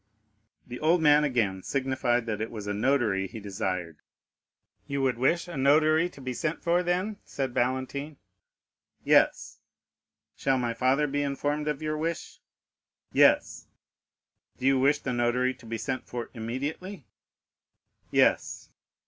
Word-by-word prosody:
The 125 0 -8
old 165 +3 +3
man 150 0 +6
again 110 -9 0
signified 130 -1 0
that 110 -2 -3
it 110 - -2
was 110 -3 -7
a 105 - -2
notary 105 -4 +1
he 110 - -9
desired. 95 -5 -4 0.9
"You 140 -1 -2
would 125 -3 0
wish 170 +7 +1
a 175 - -7
notary 155 +5 +4
to 145 - -16
be 130 -1 -4
sent 155 +5 -3
for 175 +1 +2
then?" 180 +4 -1
said 135 -3 -4
Valentine. 130 +4 -2 0.9
"Yes." - - +2 0.8
"Shall 135 -1 +1
my 120 -2 -1
father 130 +5 +2
be 145 0 -1
informed 145 +1 -2
of 150 0 -2
your 155 0 -2
wish?" 165 +1 -4 0.7
"Yes." - - +3 0.9
"Do 130 - -5
you 135 -1 +4
wish 140 +3 +4
the 135 -3 -4
notary 120 +2 +1
to 115 - -16
be 115 0 -3
sent 130 +3 -4
for 120 -1 -6
immediately?" 140 - -5 1.0
"Yes." - - +1
130 Hz, 140 wpm, -27 LUFS, 120-150 Hz, 1.0 s, man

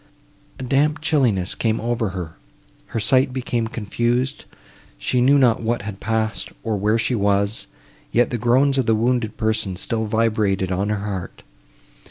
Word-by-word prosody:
A - - -7
damp 145 +4 +2
chillness 125 - +1
came 110 -1 0
over 115 -2 -1
her; 90 -4 -6 0.5
her - - -3
sight 130 +4 +3
became 120 -3 -2
confused; 120 +5 -1 0.5
she - - 0
knew 140 +3 +5
not 125 -5 +3
what 115 -1 -1
had 100 -1 -6
passed, 110 0 -1
or 110 -2 -1
where 105 +3 +1
she 115 +3 0
was, 100 0 +1 0.4
yet 120 0 +2
the 120 - -2
groans 130 +4 +3
of 130 - 0
the 110 - +4
wounded 115 -1 0
person 110 -4 -1
still 110 +4 -2
vibrated 105 -4 +1
on 95 +3 0
her 105 -1 -2
heart. 95 -4 -5
115 Hz, 160 wpm, -21 LUFS, 105-125 Hz, 0.5 s, knew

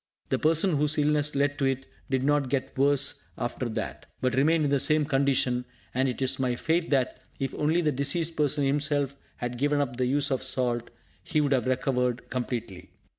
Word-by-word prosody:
The - - +1
person 160 +1 +3
whose 150 +1 +2
illness 150 0 +2
led 145 +1 +1
to 135 - +1
it 135 0 -1 0.2
did 130 -1 0
not 145 -1 +2
get 130 -1 -2
worse 140 0 +3 0.2
after 120 0 -3
that, 110 -1 -5
but 130 -1 0
remained 155 +5 +3
in 145 - 0
the 140 - +3
same 150 +2 +3
condition; 135 -3 +2 0.3
and 130 +1 +1
it 130 +1 -3
is 130 - +1
my 125 -2 0
faith 165 +6 0
that, 130 -3 0 0.2
if 135 - -3
only 155 +4 +1
the 155 -3 +1
diseased 150 +5 -1
person 150 -1 +1
himself 145 0 0 0.2
had 120 0 -5
given 145 +1 +2
up 125 -4 -2
the 125 -1 +1
use 140 +2 +1
of 130 - 0
salt, 125 -3 -1 0.3
he 155 - 0
would 145 -2 +1
have 130 -2 +1
recovered 125 -1 -1
completely. 115 -7 -4
140 Hz, 195 wpm, -27 LUFS, 130-150 Hz, 0.3 s, person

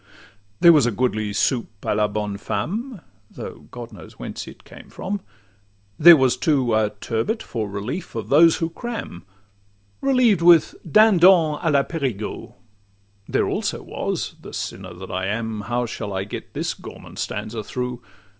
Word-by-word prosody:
There 170 -1 +9
was 145 -6 +4
a - - +1
goodly 110 -2 -1
'soupe 110 -1 -1
a - - +1
la 105 0 +2
bonne 105 -1 -3
femme,' 200 - -4 0.3
Though - - -9
God 120 -2 -9
knows 90 -6 -12
whence - - -7
it - - -13
came - - -14
from; 200 +1 -4 0.8
there 170 +1 +10
was, 130 -2 +2
too, 130 -5 +1
A 110 -1 +2
turbot 120 - -2
for 110 -3 -4
relief 110 - -5
of 110 -1 -5
those 160 +4 +6
who 165 0 -2
cram, 225 - -6 0.8
Relieved 250 -9 +3
with 170 -2 +6 0.2
'dindon 180 -7 +6
a 165 - +1
la 140 -2 +3
Parigeux;' 130 - -4 0.7
There - - +1
also - - -2
was—the - - -5
sinner 95 -2 -6
that 95 +2 -9
I 95 +1 -2
am! 110 +1 -3
How 120 +4 -1
shall 105 -3 -5
I 95 0 -2
get 100 - -8
this - - -1
gourmand - - -11
stanza 110 0 -4
through? 125 +1 -4
125 Hz, 155 wpm, -22 LUFS, 105-170 Hz, 0.8 s, there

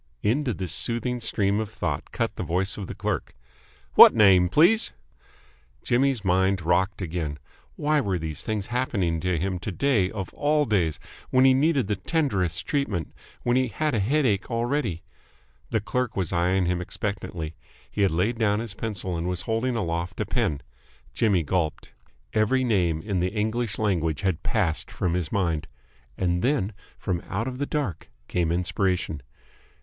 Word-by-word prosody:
Into 125 +4 +1
this 95 -5 -3
soothing 120 +1 -1
stream 105 -3 0
of 110 -2 -3
thought 110 - -3
cut - - -2
the - - -4
voice 95 +5 -1
of 100 -3 -6
the - - -7
clerk. - - -3 0.6
"What - - +10
name, 95 -5 +6
please?" 175 - +4 0.9
Jimmy's 125 -3 +1
mind 95 0 +2
rocked 95 +3 +1
again. 80 -4 -3 0.4
Why 150 0 +2
were 95 -7 -1
these 80 -2 -4
things 105 -3 -2
happening 95 -10 0
to 90 0 0
him 90 +2 -2
to 95 +4 -4
day 110 -4 +2
of 95 -3 -6
all 150 0 +2
days, 90 - +1 0.3
when 130 +1 +4
he 130 - +7
needed 140 -1 +2
the 105 0 -1
tenderest 95 - 0
treatment, 105 - -1 0.3
when 120 +1 +2
he 130 0 +2
had 150 +6 -1
a 115 - +1
headache 115 -2 +1
already? 115 - -1 0.7
The 110 - +1
clerk 125 +2 -2
was 90 -4 -1
eyeing 90 +2 +2
him 90 0 0
expectantly. 90 -4 -4 0.4
He 105 - -2
had 100 - +5
laid 100 +9 0
down 105 -2 +2
his 115 -3 -5
pencil 100 -4 -4
and 85 +1 -2
was 90 0 -2
holding 115 +4 0
aloft 85 -4 -2
a - - 0
pen. 75 -3 -1 0.5
Jimmy 100 - +2
gulped. 80 0 -2 0.4
Every 110 +5 +2
name 90 -9 +1
in 100 -4 -1
the 90 +1 +1
English 110 +2 -1
language 85 -7 0
had 95 -4 0
passed 95 -8 0
from 90 -2 -1
his 85 -3 -2
mind. 85 -6 0 0.5
And 90 -1 0
then 120 -5 +1 0.2
from 90 -4 -2
out 110 +6 -2
of 130 0 -5
the 145 - -1
dark 145 - -3 0.2
came 85 -2 0
inspiration. 90 -3 0
100 Hz, 165 wpm, -25 LUFS, 90-120 Hz, 0.9 s, What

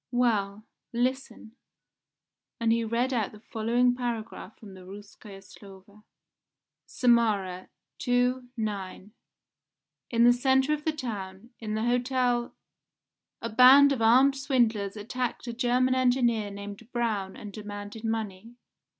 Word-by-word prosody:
Well, 215 -4 0 0.3
listen," 245 -2 -3 1.0
and 230 -1 +1
he 230 0 0
read 235 +4 -1
out 220 -5 -1
the 210 - -13
following 235 +3 +1
paragraph 230 -4 -5
from 205 -3 -13
the 185 - -13
Rouskoe 200 +1 -12
Slovo: 195 +1 -16 0.8
"Samara, 210 -7 +1 0.4
II, 245 +1 +1
ix. 205 -2 -5 1.0
In 235 -1 +2
the 240 0 +7
centre 265 +3 +2
of 300 0 -4
the 315 - +2
town, 220 -6 -7
in 215 -2 -4
the 220 - -2
Hotel, 245 0 0 0.9
a 230 - -2
band 260 +5 +7
of 265 -4 -1
armed 255 +5 +5
swindlers 230 -7 0
attacked 240 +5 -4
a 235 - -5
German 250 +1 +1
engineer 245 -4 +1
named 200 +3 -9
Braun 215 -5 -2
and 210 -2 -9
demanded 205 +1 -8
money. 225 0 -4
230 Hz, 125 wpm, -27 LUFS, 205-250 Hz, 1.0 s, the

